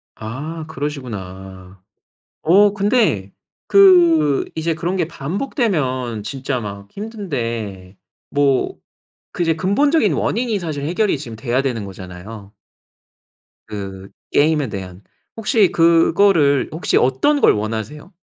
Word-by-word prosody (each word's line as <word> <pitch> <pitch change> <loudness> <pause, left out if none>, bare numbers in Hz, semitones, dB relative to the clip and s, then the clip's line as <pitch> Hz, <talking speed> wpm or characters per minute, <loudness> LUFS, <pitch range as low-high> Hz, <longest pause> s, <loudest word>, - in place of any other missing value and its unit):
아. 150 +9 -6
그러시구나. 95 -11 -7 0.6
어 200 +5 +5
근데 200 - +1 0.3
그 170 -7 +5
이제 160 0 -1
그런 175 +4 -2
게 170 -4 -1
반복되면 140 - -2
진짜 130 +3 -3
막 100 -2 -8
힘든데 115 - -5 0.3
뭐 140 -2 +1 0.6
그 175 - -1
이제 165 -1 +1
근본적인 215 - +2
원인이 230 -1 0
사실 155 -6 -4
해결이 175 +2 0
지금 120 -6 -8
돼야 120 +3 -1
되는 120 -6 -2
거잖아요. 95 +2 -10 1.2
그 95 -2 -7 0.2
게임에 150 -2 +2
대한. 95 -2 -7 0.4
혹시 215 -3 +2
그거를 165 -3 +4
혹시 160 +2 0
어떤 135 - +2
걸 - - +6
원하세요? 110 - -5
145 Hz, 235 characters per minute, -19 LUFS, 110-180 Hz, 1.2 s, 걸